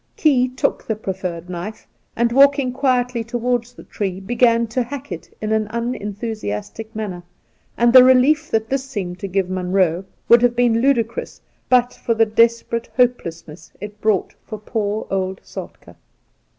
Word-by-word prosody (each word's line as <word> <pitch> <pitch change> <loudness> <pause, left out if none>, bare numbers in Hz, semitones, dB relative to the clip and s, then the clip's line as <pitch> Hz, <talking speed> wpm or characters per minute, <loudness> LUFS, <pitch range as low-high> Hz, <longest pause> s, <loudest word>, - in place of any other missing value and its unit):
Key 265 -5 +3
took 255 - -1
the 220 - 0
proffered 185 -4 -5
knife, 180 +4 -7 0.3
and, 235 0 +1
walking 275 0 +4
quietly 250 -3 0
towards 240 +1 -2
the - - -12
tree, 190 -3 -4
began 235 +3 +2
to 255 +3 0
hack 270 0 -6
it 170 -2 -7
in 215 0 -3
an 220 -1 +1
unenthusiastic 220 - -5
manner; 200 -5 -4 0.6
and 240 0 +3
the 255 -1 +10
relief 260 +5 +4
that 220 0 0
this 270 +1 -1
seemed 190 -9 -5
to 195 - -4
give 190 0 0
Munroe 185 -1 0 0.2
would 235 0 +7
have 245 -1 +3
been 235 -2 +2
ludicrous 235 -4 0 0.3
but 250 -1 +3
for 230 - -2
the 225 0 +4
desperate 230 +1 +1
hopelessness 170 -10 -1
it 210 +1 -9
brought 215 -4 +1
for 215 - -7
poor 210 0 -3 0.4
Soltk^. - - -10
230 Hz, 150 wpm, -20 LUFS, 200-245 Hz, 0.6 s, the